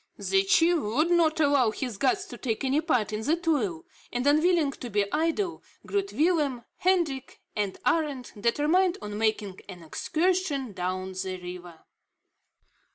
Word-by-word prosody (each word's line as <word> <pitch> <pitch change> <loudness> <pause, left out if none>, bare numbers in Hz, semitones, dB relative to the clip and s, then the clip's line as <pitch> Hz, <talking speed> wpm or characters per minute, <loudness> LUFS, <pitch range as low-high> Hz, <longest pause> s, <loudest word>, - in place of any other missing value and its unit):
The 390 0 +2
chief 345 -3 +4
would 290 +8 0
not 325 -2 +3
allow 285 -6 +4
his 225 -1 -5
guests 375 +7 +1
to - - -7
take 225 -2 -2
any 270 +3 +2
part 250 - 0
in 215 - -2
the 300 +9 +2
toil, 280 - -1 0.3
and 245 +1 -2
unwilling 310 +1 +3
to 250 -2 -8
be 205 -1 +1
idle, 330 +4 0 0.2
Groot 400 -1 -1
Willem, 295 -7 +1
Hendrik, 340 -8 0 0.2
and 205 -2 -2
Arend 280 -2 0
determined 300 - +2
on 210 0 -5
making 215 -3 -1
an 180 -3 -9
excursion 310 - -1
down 185 0 -3
the 185 0 -4
river. 180 -2 -9
275 Hz, 150 wpm, -27 LUFS, 210-335 Hz, 0.3 s, chief